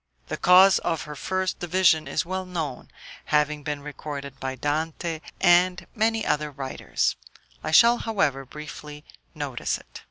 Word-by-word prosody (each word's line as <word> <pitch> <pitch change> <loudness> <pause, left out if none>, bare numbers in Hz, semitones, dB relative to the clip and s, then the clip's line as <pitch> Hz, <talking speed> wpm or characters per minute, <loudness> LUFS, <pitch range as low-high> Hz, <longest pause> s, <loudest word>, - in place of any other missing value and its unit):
The - - -3
cause 185 +2 +6
of 165 -3 -2
her 150 -1 -8
first 185 +4 -2
division 175 -2 +3
is - - -1
well 185 +2 -3
known, 160 -8 -4 0.4
having 150 0 +1
been 145 -1 -4
recorded 140 -2 -7
by 130 0 -3
Dante 160 +4 -2 0.2
and 175 0 +4
many 225 0 +1
other 150 0 0
writers; 135 -2 -2 0.5
I - - -3
shall, 235 +9 +6
however, 175 - 0
briefly 150 +1 -10 0.3
notice - - -2
it. - - -13
155 Hz, 145 wpm, -25 LUFS, 145-185 Hz, 0.5 s, cause